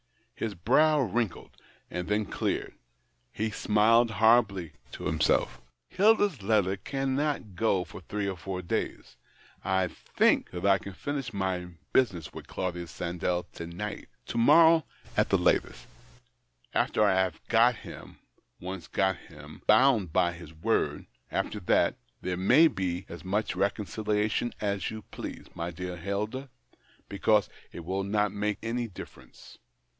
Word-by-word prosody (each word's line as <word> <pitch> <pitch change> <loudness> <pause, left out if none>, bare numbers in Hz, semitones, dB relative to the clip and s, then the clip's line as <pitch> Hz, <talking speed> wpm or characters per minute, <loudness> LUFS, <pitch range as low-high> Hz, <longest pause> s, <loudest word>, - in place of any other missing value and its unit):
His 110 -3 -4
brow 150 - +4
wrinkled, 115 -4 -2 0.4
and 90 0 -4
then 105 +1 +1
cleared; - - -2 0.6
he 110 - -2
smiled 115 +3 +4
horribly 105 -6 +3 0.2
to - - -7
himself 75 -6 +1
" - - -53
Hilda's 205 - +3
letter 100 -2 +2
cannot 135 -2 -2
go 95 -1 +2
for 90 - -11
three 100 +3 -3
or 95 - -2
four 90 +1 -5
days. 85 - -3 0.5
I 95 -1 +1
think - - +1
that 90 +1 -5
I 100 -1 +5
can 100 - -8
finish 135 +3 -4
my 95 -3 -2 0.3
business 90 -11 +1
with - - -9
Claudius 85 -3 -4
Sandell 90 +1 -2
to 85 - -7
night, 100 +5 -6 0.2
to 115 - -3
morrow 160 +5 +6 0.3
at - - +2
latest. - - +2 0.9
After 110 - +2
I 100 -2 +4
have 95 -3 +1
got 120 +2 +5
him - - -11 0.2
— - - -45
once 90 -1 -6
got 95 -2 +1
him - - -13
— - - -37
bound 130 -4 +6
him - - -13
by 85 +2 +2
his 85 -2 -11
word 80 0 -1 0.2
— - - -45
after - - -2
that, - - +2 0.2
there 90 -1 -2
may 125 - +6
be 95 - -3
as 85 - -9
much 95 +1 -1
reconciliation 105 +3 0
as 100 -2 -1
you 110 -1 -7
please, - - -7
my 85 +1 -4
dear 90 +1 -5
Hilda, 105 +9 -3 0.6
because 105 +1 +2 0.2
it 85 - -9
will 95 +2 -1
not 105 0 +1
make 105 0 -1
any 120 +1 -2
difference. 95 - -12
100 Hz, 150 wpm, -28 LUFS, 90-115 Hz, 0.9 s, morrow